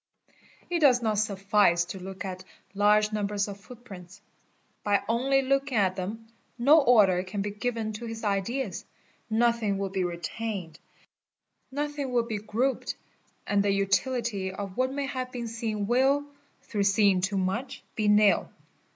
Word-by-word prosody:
It 345 - +1
does 255 -6 +5
not 215 -2 +1
suffice 200 -4 +2
to 190 - -7
look 190 +1 -7
at 185 -1 -6 0.3
large 210 +1 +3
numbers 205 -1 -1
of 200 -1 -8
foot 245 +3 -14
prints; 190 -2 -11 0.6
by 205 -1 +2
only 270 +4 +2
looking 275 -1 0
at 190 -3 +2
them 215 +5 -5 0.3
no 290 +6 +6
order 210 -9 +5
can 195 +2 -4
be 205 - -3
given 225 0 -3
to 230 +2 -6
his 225 0 -7
ideas, 205 +1 -2 0.5
1othing 225 -3 +2
will 195 0 -2
be 190 -1 -1
retained, 175 0 -4 0.9
nothing 290 -1 -3
will 240 -2 +2
be 220 -3 -3
grouped, 225 +6 -1 0.5
and 205 0 +2
the 200 - +1
utility 200 +1 0
of 195 0 -6
what 255 +1 +1
nay 280 +1 -2
have 255 -2 -4
been 240 -2 -5
seen 220 -2 -3
will, 265 +5 +2 0.4
through 205 -2 -1
seeing 200 -2 +4
too 195 +1 -1
much, 210 +8 -2
be 215 -2 -1
nil. 210 -1 +4
210 Hz, 155 wpm, -27 LUFS, 195-245 Hz, 0.9 s, no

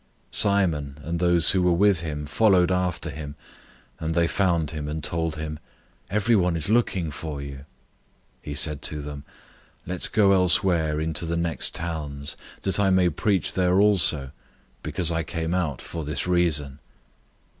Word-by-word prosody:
001:036 - - -3
Simon 80 -9 +2
and 85 +2 -3
those 85 -2 +4
who 95 - +1
were 90 0 +3
with 100 0 +3
him 75 -3 -5
followed 95 +1 +3
after 90 -1 -1
him; 75 0 -8 0.6
001:037 - - -6
and 80 +1 -2
they 85 -1 +3
found 85 -4 0
him, 75 -2 -5
and 75 +1 -4
told 80 -1 -2
him, 75 -1 -6 0.5
"Everyone 100 -4 +2
is 80 +2 -2
looking 95 -8 +1
for 75 0 -6
you." 70 -1 -7
001:038 65 - -14 0.8
He 75 -1 -6
said 75 0 0
to 75 - -3
them, 70 -1 -7 0.6
"Let's 90 +1 0
go 105 -2 +3
elsewhere 90 -4 +3
into 80 +1 -2
the 85 +1 -1
next 85 -1 -1
towns, 75 -4 -4 0.3
that 95 0 0
I 100 -1 +3
may 95 -1 +3
preach 95 +4 0
there 90 0 +2
also, 85 -10 +3 0.5
because 90 -3 -1
I 80 0 0
came 80 +1 -3
out 85 -8 -2
for 85 -1 -6
this 75 -1 -3
reason." 80 -6 0
85 Hz, 165 wpm, -24 LUFS, 75-90 Hz, 0.8 s, those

